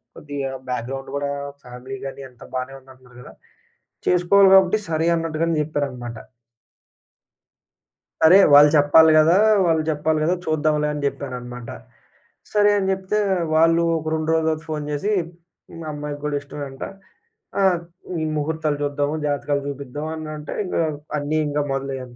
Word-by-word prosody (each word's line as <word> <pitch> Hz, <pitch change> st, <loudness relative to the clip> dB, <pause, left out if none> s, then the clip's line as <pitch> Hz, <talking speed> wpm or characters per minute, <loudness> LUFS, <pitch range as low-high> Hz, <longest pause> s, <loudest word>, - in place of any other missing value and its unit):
కొద్దిగా 145 Hz, -2 st, -5 dB, 0.2 s
బ్యాక్‌గ్రౌండ్ 130 Hz, +2 st, -4 dB
కూడా 140 Hz, 0 st, -2 dB, 0.3 s
ఫ్యామిలీ 125 Hz, +2 st, -9 dB
గాని 135 Hz, 0 st, -7 dB
అంతా 125 Hz, -1 st, -15 dB
బానే 130 Hz, +1 st, -3 dB
ఉంది 130 Hz, 0 st, -18 dB
అంటున్నారు 125 Hz, -1 st, -20 dB
గదా! -, -, -13 dB, 0.7 s
చేసుకోవాలి 190 Hz, +2 st, +5 dB
గాబట్టి 190 Hz, +2 st, +4 dB
సరే 160 Hz, 0 st, 0 dB
అన్నట్టుగానే 165 Hz, 0 st, -1 dB
జెప్పారనమాట. 130 Hz, -6 st, -4 dB, 2.0 s
సరే 160 Hz, +4 st, +8 dB, 0.2 s
వాళ్ళు 145 Hz, +1 st, +9 dB
చెప్పాలి 160 Hz, +2 st, +6 dB
గదా! 165 Hz, +4 st, +5 dB, 0.3 s
వాళ్ళు 160 Hz, -2 st, +2 dB
చెప్పాలి 155 Hz, +1 st, 0 dB
గదా! 175 Hz, +3 st, +2 dB
చూద్దాంలే 155 Hz, -1 st, +1 dB
అని 150 Hz, -, -4 dB
జెప్పానన్నమాట. 125 Hz, -4 st, -5 dB, 0.8 s
సరే 210 Hz, -1 st, +4 dB
అని 190 Hz, -1 st, 0 dB
జెప్తే 190 Hz, +2 st, -1 dB, 0.4 s
వాళ్ళు 165 Hz, +1 st, +4 dB
ఒక 160 Hz, -, -7 dB
2 155 Hz, 0 st, -2 dB
రోజులు 160 Hz, 0 st, +1 dB
తర్వాత 155 Hz, 0 st, -3 dB
ఫోన్ 150 Hz, -1 st, -3 dB
జేసి 175 Hz, +9 st, -1 dB, 0.7 s
మా 155 Hz, -, -7 dB
అమ్మాయికి 145 Hz, 0 st, -6 dB
గూడా 145 Hz, -1 st, -1 dB
ఇష్టమేంట. 140 Hz, -1 st, -8 dB, 0.8 s
ఆ! -, -, +3 dB, 0.5 s
హ్మ్. 160 Hz, -2 st, -2 dB
ముహూర్తాలు 155 Hz, 0 st, -1 dB
జూద్దాము 145 Hz, +1 st, -1 dB
జాతకాలు 145 Hz, 0 st, -1 dB
జూపిద్దాం 140 Hz, +1 st, -6 dB
అన్నంటే 155 Hz, -1 st, -7 dB
ఇంగా 175 Hz, -, 0 dB, 0.3 s
అని 150 Hz, +2 st, -1 dB
ఇంగ 145 Hz, 0 st, -1 dB
మొదలయ్యాను. 135 Hz, -2 st, -5 dB
150 Hz, 135 wpm, -22 LUFS, 135-160 Hz, 2.0 s, వాళ్ళు